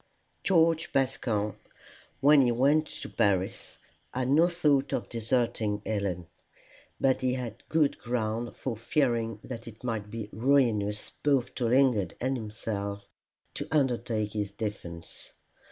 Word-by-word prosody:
George 165 -3 +3
Bascombe, 120 -6 0 0.6
when 145 +1 +7
he 125 -2 +3
went 145 +6 +3
to - - -8
Paris, 95 -2 0 0.3
had 130 0 -1
no 160 +5 +5
thought 150 -6 +2
of - - -2
deserting 115 -3 0
Helen. 100 -5 -2 0.7
But 135 -1 +2
he 130 -1 +1
had 120 -3 -5
good 155 -3 +2
ground 120 -1 -2
for 125 -4 -3
fearing 115 -2 0
that 115 -2 -7
it 115 +2 -11
might 110 -4 -3
be 110 -1 -5
ruinous 110 -4 +2
both 135 -4 +2
to 120 - -2
Lingard 120 -7 +3
and 130 +2 0
himself 105 -3 -4 0.5
to - - -5
undertake 120 -7 0
his 105 -2 -1
defence. 85 -6 -6
120 Hz, 130 wpm, -29 LUFS, 105-135 Hz, 0.7 s, when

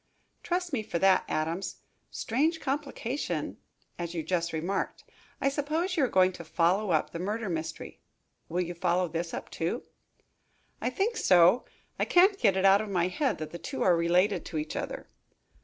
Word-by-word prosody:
"Trust 355 -2 -2
me 245 - +1
for 210 - -3
that, 190 +1 +4
Adams. 165 +5 -2 0.3
Strange 310 +8 0
complication, 275 -2 -3 0.4
as 170 0 -4
you 165 - -2
just 175 -1 -1
remarked. 175 +5 -2 0.4
I - - +1
suppose 310 +6 -1
you 310 - +2
are - - +4
going 185 -1 +4
to 175 -2 -9
follow 180 +5 +1
up 160 -3 +1
the 165 - -5
murder 210 +3 -2
mystery. 160 -2 -5 0.5
Will 175 +2 0
you 175 0 -3
follow 175 +1 +1
this 165 +1 -3
up, - - -6
too?" 170 +10 -2 1.0
"I - - 0
think 450 +4 -1
so. 180 +6 +5 0.3
I - - +2
can't 385 +3 +5
get 190 -1 +3
it 190 - +2
out 195 +1 +6
of 215 - -5
my 180 -2 +1
head 275 +7 0
that 155 - -6
the 170 - -7
two - - -3
are 180 - +5
related 175 +3 +2
to 160 - -5
each 155 0 -3
other." - - -5
185 Hz, 180 wpm, -29 LUFS, 170-265 Hz, 1.0 s, out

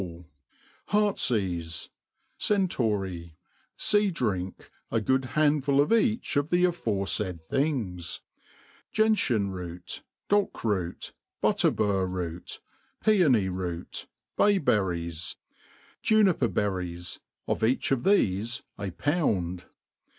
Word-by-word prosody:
ll, 85 -1 -8 0.6
Heart*s 210 -1 +2
eafe, 90 -8 -2 0.5
Centaury, 105 - 0 0.4
Sea 210 -2 +3
driak, 95 - -3 0.2
a 115 - +1
good 130 +4 +1
handful 145 -2 +3
of 145 +10 +4
each 225 - +2
of 145 +2 +1
the 175 0 +3
af9refai<) 100 - 0
things* 95 - -2 0.7
Gentian 135 - +2
ro9t, 90 -1 -6 0.3
Dock>root, 105 - 0 0.3
Biitterbur 95 -3 +2
root, 90 -1 -5 0.4
Piony 155 - +4
root, 90 -2 -5 0.3
Bay 205 -1 +4
t>erries, 85 - -1 0.7
Juniper 200 - +4
berries, 90 -5 -2 0.3
of - - -1
each 125 +5 +2
of 135 - +3
thefe 120 - +1 0.2
a 100 -1 -2
poiind. 90 - 0
105 Hz, 95 wpm, -28 LUFS, -, 0.7 s, of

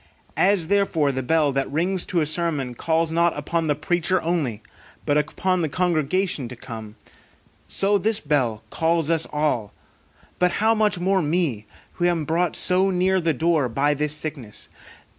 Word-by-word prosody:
As 195 -5 +2
therefore 190 -8 +2
the 130 0 -3
bell 150 +2 +2
that 135 0 -2
rings 180 +5 0
to 175 -3 +1
a - - +1
sermon 150 -5 -1
calls 160 +5 0
not 170 0 +2
upon 160 +3 -1
the 145 - +2
preacher 175 +4 0
only, 145 -11 -1 0.4
but 145 - +1
upon 175 +5 0
the 160 - -1
congregation 175 -2 0
to 125 - -8
come, 110 -4 -9 0.7
so 200 +1 +1
this 215 +2 0
bell 130 - 0
calls 165 -1 +1
us 165 -1 +1
all; 145 - -1 0.6
but 180 0 +2
how 220 +2 +3
much 210 -3 +1
more 190 +2 +1
me, 150 - -1 0.3
who 175 - -1
am 170 -3 +1
brought 165 +2 0
so 185 +2 +2
near 185 0 +1
the 165 -1 +1
door 155 -2 +1
by 140 +5 +1
this 150 +1 -1
sickness. 145 -9 -6
160 Hz, 165 wpm, -23 LUFS, 145-180 Hz, 0.7 s, how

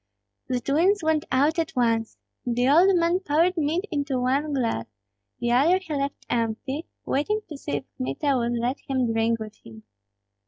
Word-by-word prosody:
The 255 -1 0
twins 340 +10 +2
went 315 -1 +1
out 290 +6 +3
at 325 - -2
once. 230 -2 +1 0.3
The 245 +1 +1
old 350 +7 +6
man 340 +1 +2
poured 345 +1 +2
mead 325 +4 0
into 285 -4 -1
one 275 +4 0
glass; 230 - -1 0.5
the 240 0 0
other 295 +9 +4
he 370 -5 -6
left 280 -1 -3
empty, 240 +7 -2 0.2
waiting 420 +11 0
to 305 - -6
see 275 - -6
if 145 -1 -1
Kmita 135 - 0
would 240 -1 0
let 245 +4 -1
him 255 -4 0
drink 225 +1 +1
with 215 -1 -8
him. 110 -1 -13
275 Hz, 170 wpm, -25 LUFS, 235-315 Hz, 0.5 s, old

